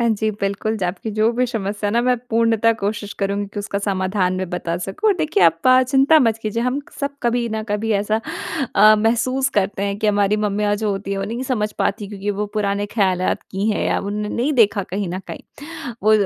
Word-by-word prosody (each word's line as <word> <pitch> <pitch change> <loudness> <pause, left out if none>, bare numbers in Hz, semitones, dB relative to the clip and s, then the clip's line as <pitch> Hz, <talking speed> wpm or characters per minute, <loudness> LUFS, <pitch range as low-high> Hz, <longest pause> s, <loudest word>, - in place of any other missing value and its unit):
हाँ 235 - +2
जी, 220 0 0
बिल्कुल, 200 +2 -1
ज 205 - -7
आपकी 185 +5 -3
जो 215 +2 +2
भी 250 +2 +1
समस्या 210 -3 -3
है - - -3
न 240 - +3
मैं 250 0 +3
पूर्णतः 230 0 +3
कोशिश 205 0 -3
करूँगी 200 +1 -1
कि - - -5
उसका 200 0 -3
समाधान 190 -1 0
में 185 -1 -3
बता 170 -1 -2
सकूँ। 195 - -1
और 410 - +4
देखिए 295 - +4 0.2
प 255 0 +7
चिंता 275 +4 +5
मत 225 -4 +2
कीजिए, 220 +2 -1
हम 255 +3 0 0.2
सब 280 0 -2
कभी 235 0 +1
न 220 0 -2
कभी 210 +2 -1
ऐसा 215 +2 0 0.6
अ, 215 +2 +8
महसूस 240 +5 +1
करते 200 0 0
हैं 200 0 -1
कि 215 - 0
हमारी 205 0 +2
मम्मियाँ 210 0 0
जो 210 0 -1
होती 195 0 -3
है 195 - -2
वो 195 - -2
नहीं 235 +5 -4
समझ 215 -5 -1
पातीं 205 0 -1
क्योंकि 205 0 -4
वो 205 +1 -2
पुराने 205 -1 0
खयालात 190 -4 0
की 200 +3 0
हैं 210 - -1
या - - +1
उन 200 +1 -4
ने 210 - -3
नहीं 260 +8 0
देखा 215 -5 +3
कहीं 200 -2 -2
न 180 +2 -3
कहीं - - -11 0.4
वो 215 - +5
210 Hz, 225 wpm, -20 LUFS, 200-230 Hz, 0.6 s, अ